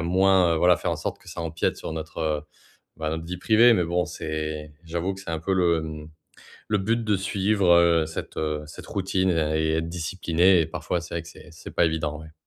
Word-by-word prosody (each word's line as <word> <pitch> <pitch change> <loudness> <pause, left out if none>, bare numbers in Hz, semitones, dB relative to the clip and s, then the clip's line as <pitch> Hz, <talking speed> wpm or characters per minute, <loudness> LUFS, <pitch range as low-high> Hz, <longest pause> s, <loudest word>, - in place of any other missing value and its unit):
à - - -2
moins, 90 0 +4
heu, - - 0
voilà, 90 +2 +5
faire - - -1
en - - -2
sorte - - -4
que - - -16
ça - - -6
empiète 80 0 -1
sur - - -6
notre, 80 0 -6
heu, 75 -2 0 0.5
bah, 80 -1 -3
notre 80 0 -4
vie 90 +1 -5
privée. 115 +4 +5
Mais 90 - +1
bon, 90 0 0
c'est 75 -2 -5
j'avoue 85 +3 -2
que 95 - -10
c'est 95 -3 -7
un 80 - -2
peu 95 +3 0
le, 85 -3 +2
mmh, 75 -1 -7 0.6
le 105 -1 +2
but 115 +4 0
de 105 -2 +2
suivre, 100 0 +1
heu, 85 -2 +4
cette, 80 - -7
heu, 75 -1 -1
cette 75 - -11
routine 95 -1 0
et 80 -2 +1
et 80 - +1
être 80 - -2
discipliné 90 +1 +2
et 80 - +1
parfois 85 +2 -3
c'est 85 - -8
vrai 85 - -2
que 85 - -13
c'est 90 - -14
c'est - - -11
pas - - +4
évident, 80 -2 -2
ouais. 80 0 -12
85 Hz, 240 wpm, -25 LUFS, 80-95 Hz, 0.6 s, voilà